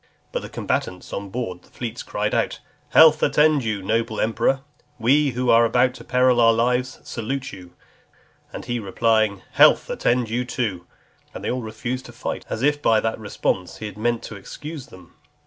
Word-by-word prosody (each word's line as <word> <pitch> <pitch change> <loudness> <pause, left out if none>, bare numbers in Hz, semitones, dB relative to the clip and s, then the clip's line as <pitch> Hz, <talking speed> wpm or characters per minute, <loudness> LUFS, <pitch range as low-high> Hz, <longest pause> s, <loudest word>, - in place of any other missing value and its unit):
But - - -2
the - - -8
combatants 90 0 -3
on 100 0 -4
board 95 -5 -4
the - - -23
fleets 120 -1 -6
crying - - -2
out, - - 0 0.3
"Health 155 -1 +7
attend 150 -2 +3
you, 105 -3 -2
noble 110 +1 -1
emperor! 115 +4 +1 0.4
We, 140 +5 +3
who 125 +1 +1
are 115 +1 +6
about 125 +2 +3
to - - -12
peril 125 -1 +3
our 115 0 +6
lives, 125 +2 0
salute 135 +4 -4
you;" 90 -2 -12 0.8
and - - -7
he 120 0 -2
replying, 110 -1 +1
"Health - - +5
attend 120 -1 +1
you 120 +3 -1
too," 110 -8 -3 0.5
they - - -3
all 125 0 -2
refused 120 +3 -5
to 120 - -12
fight, 120 - -5
as 110 - -3
if 145 +1 +2
by 110 -5 +4
that 110 0 -2
response 95 -3 -2
he - - -7
had 105 - -7
meant 120 +2 -1
to 110 - -8
excuse 145 +8 -8
them. 90 -8 -16
115 Hz, 180 wpm, -22 LUFS, 110-125 Hz, 0.8 s, Health